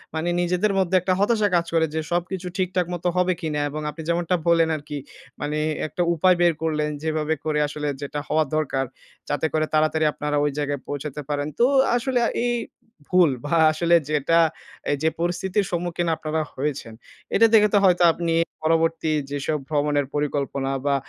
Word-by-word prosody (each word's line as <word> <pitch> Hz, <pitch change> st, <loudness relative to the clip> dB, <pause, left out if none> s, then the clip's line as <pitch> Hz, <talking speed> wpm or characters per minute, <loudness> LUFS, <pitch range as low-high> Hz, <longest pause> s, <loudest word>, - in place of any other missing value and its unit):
মানি 160 Hz, +2 st, -1 dB
নিজেদের 180 Hz, +4 st, +1 dB
মধ্যে 185 Hz, 0 st, +1 dB
একটা 185 Hz, +1 st, +1 dB
হতাশা 215 Hz, +1 st, +3 dB
কাজ 170 Hz, -, +2 dB
করে। 160 Hz, -1 st, +3 dB
যে 160 Hz, -, +1 dB
সবকিছু 180 Hz, +1 st, -2 dB
ঠিকঠাক 185 Hz, -1 st, 0 dB
মত 175 Hz, -, -5 dB
হবে 180 Hz, 0 st, +3 dB
কিনা? 155 Hz, -2 st, -2 dB
এবং 155 Hz, +1 st, -5 dB
আপনি 150 Hz, +2 st, -8 dB
যেমনটা 175 Hz, +1 st, +1 dB
বললেন 165 Hz, -1 st, +4 dB
আরকি, 150 Hz, 0 st, -6 dB, 0.4 s
মানে 150 Hz, +1 st, -2 dB, 0.3 s
একটা 175 Hz, -, -4 dB
উপায় 180 Hz, +2 st, +4 dB
বের 175 Hz, -1 st, +4 dB
করলেন, 150 Hz, -2 st, 0 dB
যেভাবে 155 Hz, -1 st, 0 dB
করে 155 Hz, -1 st, 0 dB
আসলে 150 Hz, 0 st, -4 dB
যেটা 145 Hz, +1 st, -4 dB
হওয়া 155 Hz, 0 st, +2 dB
দরকার, 135 Hz, -3 st, 0 dB, 0.4 s
যাতে 145 Hz, +1 st, 0 dB
করে 155 Hz, 0 st, +2 dB
তাড়াতাড়ি 155 Hz, 0 st, +2 dB
আপনারা 150 Hz, 0 st, -2 dB
ওই 145 Hz, -, +1 dB
জায়গায় 145 Hz, -2 st, -2 dB
পৌঁছাতে 145 Hz, 0 st, -5 dB
পারেন। 145 Hz, 0 st, -1 dB
তো -, -, +7 dB, 0.3 s
আসলে 245 Hz, +2 st, -1 dB
আ -, -, 0 dB, 0.2 s
এই 240 Hz, -, +1 dB, 0.6 s
ভুল 180 Hz, -4 st, +5 dB, 0.2 s
ভা 165 Hz, +3 st, +1 dB
আসলে 170 Hz, +2 st, +2 dB
যেটা, 155 Hz, +2 st, +2 dB, 0.5 s
এই 145 Hz, -, +1 dB
যে 160 Hz, -, +4 dB
পরিস্থিতির 180 Hz, +4 st, 0 dB
সম্মুখীন 175 Hz, 0 st, -2 dB
আপনারা 155 Hz, 0 st, -2 dB
হয়েছেন, 135 Hz, -5 st, -3 dB, 0.4 s
এটা 230 Hz, -, +6 dB
দেখে 210 Hz, -1 st, +6 dB
তো -, -, +6 dB
হয়তো 180 Hz, -1 st, +4 dB
আপনি 170 Hz, -1 st, -1 dB, 0.3 s
পরবর্তী, 165 Hz, 0 st, +1 dB, 0.2 s
যেসব 145 Hz, +2 st, -2 dB
ভ্রমণের 145 Hz, -2 st, +1 dB
পরিকল্পনা 140 Hz, -2 st, -1 dB
বা 140 Hz, -, +2 dB
160 Hz, 175 wpm, -23 LUFS, 150-175 Hz, 0.6 s, তো